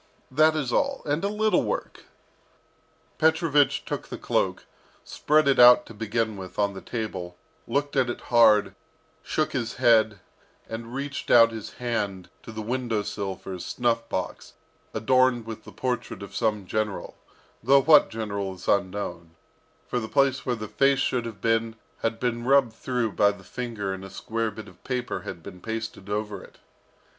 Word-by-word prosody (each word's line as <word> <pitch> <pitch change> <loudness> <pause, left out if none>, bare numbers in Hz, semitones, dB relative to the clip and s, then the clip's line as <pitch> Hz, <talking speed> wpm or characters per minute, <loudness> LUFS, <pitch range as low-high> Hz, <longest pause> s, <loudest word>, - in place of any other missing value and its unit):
That 155 +4 +4
is 135 -6 -2
all. 275 -1 0
And 150 +4 -1
a - - +2
little 215 +1 +2
work - - -4 0.5
" - - -38
Petrovich 160 -3 +3
took - - -4
the - - -6
cloak, - - -1 0.4
spread 155 0 +2
it 140 - +3
out, 120 0 +8
to - - -11
begin 110 0 -2
with, 95 -1 -9
on 100 -1 +1
the 95 - -8
table, 95 -7 -5 0.3
looked 145 +1 -1
at 130 -2 +2
it 120 - -4
hard, 110 -3 +6 0.5
shook 155 - -1
his 120 -5 -3
head, 110 -5 +4 0.5
reached 125 +5 -5
out 115 -1 +7
his 110 -2 -7
hand 105 -6 -3
to - - -10
the 110 0 -6
window 115 -2 -1
sill 100 -2 -4
for 95 - -8
his 90 - -6
snuff 120 -2 -1
box, - - -4 0.4
adorned 130 +1 +2
with 110 -1 -8
the - - -11
portrait 125 -5 -3
of 100 - -10
some 105 -4 0
general, 105 +1 -3 0.5
though 135 +4 +5
what 150 -1 +7
general 100 -3 -4
is 90 - -12
unknown, 90 -4 -1 0.5
for 125 - -1
the 110 - -5
place 135 -1 +2
where 125 - +1
the 110 -2 -6
face 135 +5 +3
should 125 -2 0
have 105 -4 -9
been 115 0 +1 0.2
had 115 0 -2
been 120 -1 -1
rubbed 135 -2 +4
through 120 -1 -2
by 100 +1 +4
the 100 -2 -7
finger 110 -3 -4
and 95 0 -7
a 95 - -8
square 115 +3 -3
bit 110 -1 -9
of 90 -2 -17
paper 125 -2 -3
had 85 - -8
been 90 -2 -10
pasted 110 -2 -5
over 105 -2 -3
it. - - -16
115 Hz, 175 wpm, -26 LUFS, 105-130 Hz, 0.5 s, out